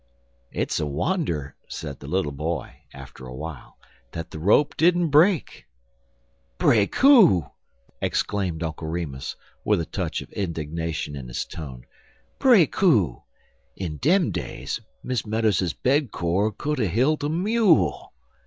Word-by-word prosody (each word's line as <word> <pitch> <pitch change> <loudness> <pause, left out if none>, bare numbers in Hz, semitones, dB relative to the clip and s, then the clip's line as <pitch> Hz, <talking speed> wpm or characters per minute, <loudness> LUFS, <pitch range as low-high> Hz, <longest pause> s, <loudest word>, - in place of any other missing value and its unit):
"It's - - -1
a - - -1
wonder," 75 - -2
said 70 -4 -7
the 70 - -10
little 90 -2 0
boy, 80 +4 -4
after 65 -1 -11
a 65 - -8
while, 75 0 -8 0.4
"that 85 -1 -6
the 80 - -7
rope 105 - +3
didn't 175 +1 +3
break." 160 +4 +3 0.9
"Break 105 -4 +3
who?" 220 - +6 0.6
exclaimed 90 -5 -1
Uncle 80 0 -4
Remus, 80 -5 -4 0.3
with - - +2
a 85 - -2
touch - - -3
of - - -19
indignation 80 -4 -3
in 65 -3 -7
his - - -3
tone 65 -6 -9 0.5
"break 230 - +5
who? 105 - +3 0.5
In 80 -5 -5
dem 170 - +2
days, - - -4 0.2
Miss 125 -4 -2
Meadows's 105 -5 0
bed 135 -2 +1
cord 95 +5 0
would 150 -1 0
a 110 - +2
hilt 130 - +1
a 145 - 0
mule." 180 - +2
95 Hz, 135 wpm, -24 LUFS, -, 0.9 s, who